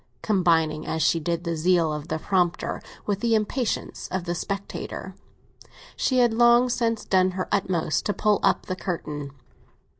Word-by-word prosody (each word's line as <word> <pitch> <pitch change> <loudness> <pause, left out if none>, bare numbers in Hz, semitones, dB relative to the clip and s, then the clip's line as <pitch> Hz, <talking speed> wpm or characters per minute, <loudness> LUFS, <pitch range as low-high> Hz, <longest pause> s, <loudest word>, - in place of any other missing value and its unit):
Combining 165 -6 +2
as 160 - -1
she 165 - +3
did 170 +2 -2
the 170 -1 -2
zeal 165 -1 +2
of 150 +1 -5
the 160 - -2
prompter 175 +1 0 0.2
with 200 -2 -1
the 230 +1 +2
impatience 220 +2 -2
of 185 -1 -2
the 175 0 -2
spectator, 200 +3 -5 0.8
she 260 - +1
had 240 -2 +4
long 240 +2 +5
since 230 -2 0
done 185 -1 +3
her 185 - -2
utmost 185 -6 0
to 205 - +1
pull 210 -1 +2
up 195 - +2
the 185 - -3
curtain. 150 -6 -4
185 Hz, 160 wpm, -25 LUFS, 165-215 Hz, 0.8 s, long